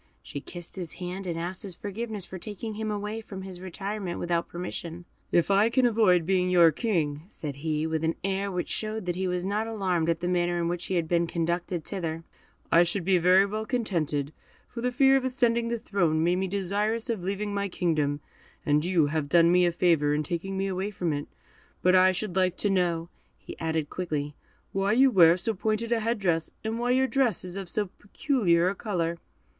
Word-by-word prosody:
She 140 Hz, -, -7 dB
kissed 175 Hz, +4 st, -10 dB
his 175 Hz, -4 st, -4 dB
hand, 180 Hz, +2 st, -6 dB
and 170 Hz, -2 st, -2 dB
asked 175 Hz, +3 st, -4 dB
his 195 Hz, -5 st, -5 dB
forgiveness 205 Hz, 0 st, -5 dB
for 190 Hz, -, -8 dB
taking 215 Hz, +3 st, -6 dB
him 215 Hz, +1 st, -3 dB
away 210 Hz, +1 st, -3 dB
from 195 Hz, -3 st, -8 dB
his 185 Hz, -2 st, -8 dB
retirement 190 Hz, 0 st, -4 dB
without 170 Hz, -1 st, 0 dB
his -, -, -32 dB
permission. 175 Hz, -1 st, -6 dB, 0.3 s
"If 175 Hz, +3 st, +3 dB
I 205 Hz, +3 st, +4 dB
can 255 Hz, +1 st, +3 dB
avoid 210 Hz, -8 st, +4 dB
being 180 Hz, 0 st, +2 dB
your 170 Hz, -2 st, +6 dB
king," 155 Hz, -, -1 dB
said 145 Hz, -9 st, -6 dB
he, 155 Hz, +1 st, -1 dB
with 160 Hz, 0 st, -1 dB
an 160 Hz, +1 st, +1 dB
air 195 Hz, +1 st, -1 dB
which 180 Hz, -1 st, -2 dB
showed 215 Hz, -1 st, -3 dB
that 175 Hz, -1 st, -1 dB
he 190 Hz, +1 st, -1 dB
was 180 Hz, 0 st, -1 dB
not 210 Hz, +3 st, -1 dB
alarmed 185 Hz, -7 st, 0 dB
at 165 Hz, -, +1 dB
the 175 Hz, -, -2 dB
manner 175 Hz, -1 st, +1 dB
in 170 Hz, -, 0 dB
which 175 Hz, 0 st, -3 dB
he 190 Hz, -, -1 dB
had 170 Hz, -2 st, 0 dB
been 170 Hz, 0 st, +1 dB
conducted 170 Hz, 0 st, -2 dB
thither, 165 Hz, -4 st, -3 dB, 0.5 s
"I 170 Hz, -, +7 dB
should 175 Hz, +1 st, 0 dB
be 185 Hz, -1 st, +4 dB
very 185 Hz, +3 st, +5 dB
well 215 Hz, +2 st, -3 dB
contented, 165 Hz, -, -1 dB, 0.3 s
for 235 Hz, -, -7 dB
the 250 Hz, +1 st, 0 dB
fear 270 Hz, +2 st, +5 dB
of 265 Hz, -, -2 dB
ascending 240 Hz, -3 st, +1 dB
the 235 Hz, 0 st, -1 dB
throne 170 Hz, -7 st, 0 dB
made 175 Hz, +2 st, +2 dB
me 190 Hz, +1 st, -1 dB
desirous 205 Hz, +4 st, -1 dB
of 210 Hz, -6 st, -4 dB
leaving 200 Hz, +2 st, -2 dB
my 200 Hz, 0 st, -1 dB
kingdom, 150 Hz, -5 st, 0 dB, 0.4 s
and 150 Hz, +1 st, +3 dB
you 175 Hz, -3 st, +3 dB
have 145 Hz, 0 st, -2 dB
done 170 Hz, +2 st, +5 dB
me 180 Hz, 0 st, +5 dB
a -, -, +2 dB
favour 165 Hz, -4 st, +2 dB
in 150 Hz, -, 0 dB
taking 175 Hz, +5 st, -3 dB
me 195 Hz, -, 0 dB
away 190 Hz, +1 st, -2 dB
from 175 Hz, -6 st, -2 dB
it; 145 Hz, 0 st, -4 dB, 0.6 s
but 185 Hz, +1 st, +5 dB
I 185 Hz, 0 st, +6 dB
should 185 Hz, 0 st, -3 dB
like 185 Hz, -1 st, +2 dB
to 205 Hz, -, 0 dB
know," 170 Hz, -3 st, 0 dB, 0.5 s
added 160 Hz, 0 st, 0 dB
he, -, -, -35 dB
quickly, 150 Hz, -5 st, -3 dB, 0.4 s
"why 195 Hz, +2 st, +1 dB
you 265 Hz, +3 st, +5 dB
wear 170 Hz, -4 st, +6 dB
so 225 Hz, +5 st, 0 dB
pointed 215 Hz, +3 st, -1 dB
a 235 Hz, -, +3 dB
head 230 Hz, +2 st, 0 dB
dress, 170 Hz, -5 st, 0 dB
and 220 Hz, +1 st, -2 dB
why 240 Hz, +1 st, -1 dB
your 260 Hz, +1 st, +4 dB
dress 260 Hz, -7 st, +1 dB
is 180 Hz, 0 st, -4 dB
of 195 Hz, -3 st, -5 dB
so 210 Hz, +2 st, 0 dB
peculiar 200 Hz, -, +1 dB
a 190 Hz, -, +1 dB
colour?" 170 Hz, -5 st, -2 dB
185 Hz, 215 wpm, -27 LUFS, 170-210 Hz, 0.6 s, I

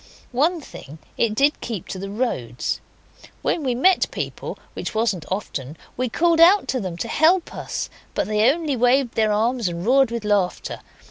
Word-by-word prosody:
One 315 Hz, +8 st, +2 dB
thing, 155 Hz, -, -11 dB, 0.2 s
it 220 Hz, -2 st, +1 dB
did 285 Hz, +5 st, +2 dB
keep 220 Hz, -7 st, -5 dB
to 190 Hz, -, -5 dB
the 195 Hz, +1 st, -5 dB
roads. 195 Hz, -, -2 dB, 0.6 s
When 335 Hz, -, 0 dB
we 255 Hz, -4 st, 0 dB
met 370 Hz, +9 st, +3 dB
people, -, -, -5 dB, 0.2 s
which -, -, -5 dB
wasn't 205 Hz, -7 st, 0 dB
often, 155 Hz, -7 st, -4 dB, 0.2 s
we 250 Hz, 0 st, -1 dB
called 335 Hz, +6 st, +2 dB
out 370 Hz, +5 st, +6 dB
to 260 Hz, -, 0 dB
them 185 Hz, -6 st, -5 dB
to 170 Hz, -, -3 dB
help 335 Hz, +3 st, +3 dB
us, -, -, -4 dB, 0.3 s
but -, -, +1 dB
they 215 Hz, +2 st, +3 dB
only 310 Hz, -2 st, -2 dB
waved 250 Hz, +1 st, +2 dB
their 220 Hz, -1 st, +2 dB
arms 230 Hz, +1 st, +1 dB
and 170 Hz, +1 st, -4 dB
roared 265 Hz, +1 st, +4 dB
with 230 Hz, -2 st, -4 dB
laughter. 200 Hz, -3 st, 0 dB
235 Hz, 180 wpm, -22 LUFS, 200-275 Hz, 0.6 s, out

